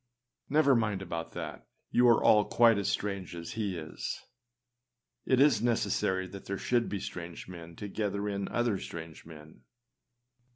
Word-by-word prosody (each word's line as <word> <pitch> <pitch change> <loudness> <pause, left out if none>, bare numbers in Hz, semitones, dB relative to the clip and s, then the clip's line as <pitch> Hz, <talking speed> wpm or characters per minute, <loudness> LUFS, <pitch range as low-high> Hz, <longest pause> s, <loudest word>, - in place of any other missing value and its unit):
Never 145 -1 +5
mind 105 -4 0
about 85 -2 -5
that. - - -6 0.2
You 125 0 +5
are 115 -2 +5
all 105 -1 +6
quite 115 -3 +5
as 100 - 0
strange 100 -4 -2
as 85 -1 -6
he 105 -5 -2
is. 80 -1 -5 1.0
It 130 - +4
is 145 -3 +5
necessary 100 -5 +1
that 100 +1 -10
there 100 - -3
should 120 +2 +1
be 100 - -2
strange 85 -2 -7
men 85 -2 -10
to 105 - -6
gather 100 0 -2
in 100 -1 -2
other 120 -5 0
strange 80 -1 -8
men. 80 -1 -13
100 Hz, 160 wpm, -30 LUFS, 85-115 Hz, 1.0 s, all